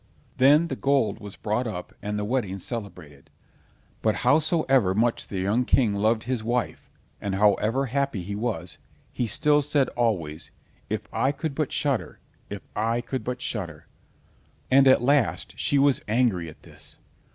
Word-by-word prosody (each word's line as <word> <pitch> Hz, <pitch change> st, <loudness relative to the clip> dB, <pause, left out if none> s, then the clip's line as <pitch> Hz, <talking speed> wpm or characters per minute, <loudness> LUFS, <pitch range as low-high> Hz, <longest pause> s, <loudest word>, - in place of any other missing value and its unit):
Then 145 Hz, +6 st, +5 dB
the -, -, -3 dB
gold 135 Hz, -8 st, +1 dB
was 105 Hz, -2 st, -9 dB
brought 110 Hz, +3 st, -1 dB
up 90 Hz, -5 st, -6 dB
and 105 Hz, 0 st, -3 dB
the 105 Hz, -, -2 dB
wedding 105 Hz, -5 st, -1 dB
celebrated; 90 Hz, -, -7 dB, 0.7 s
but 110 Hz, -1 st, +2 dB
howsoever 135 Hz, -, +3 dB
much 115 Hz, +2 st, +1 dB
the 100 Hz, -, -5 dB
young 100 Hz, +7 st, +1 dB
King 120 Hz, -4 st, +2 dB
loved 110 Hz, +2 st, +1 dB
his 125 Hz, -2 st, -2 dB
wife, 120 Hz, +2 st, -2 dB, 0.3 s
and 100 Hz, -1 st, -2 dB
however 105 Hz, +6 st, +2 dB
happy 135 Hz, -6 st, -1 dB
he 100 Hz, +3 st, -5 dB
was, 100 Hz, -7 st, -3 dB, 0.3 s
he 120 Hz, -, -1 dB
still 150 Hz, +6 st, +3 dB
said 140 Hz, -2 st, +1 dB
always: 85 Hz, -10 st, -2 dB, 0.4 s
"If -, -, -3 dB
I 135 Hz, -, +2 dB
could 145 Hz, +1 st, -4 dB
but 150 Hz, -1 st, -2 dB
shudder—if 120 Hz, -6 st, -4 dB
I 115 Hz, +3 st, 0 dB
could 130 Hz, +2 st, -4 dB
but 125 Hz, 0 st, -4 dB
shudder." 85 Hz, -8 st, -4 dB, 0.9 s
And 135 Hz, +1 st, +6 dB
at 130 Hz, -2 st, +5 dB
last 125 Hz, -8 st, +1 dB
she 140 Hz, +4 st, +1 dB
was 140 Hz, -1 st, +3 dB
angry 105 Hz, -7 st, +1 dB
at 75 Hz, -, -16 dB
this. -, -, -8 dB
115 Hz, 155 wpm, -25 LUFS, 100-135 Hz, 0.9 s, And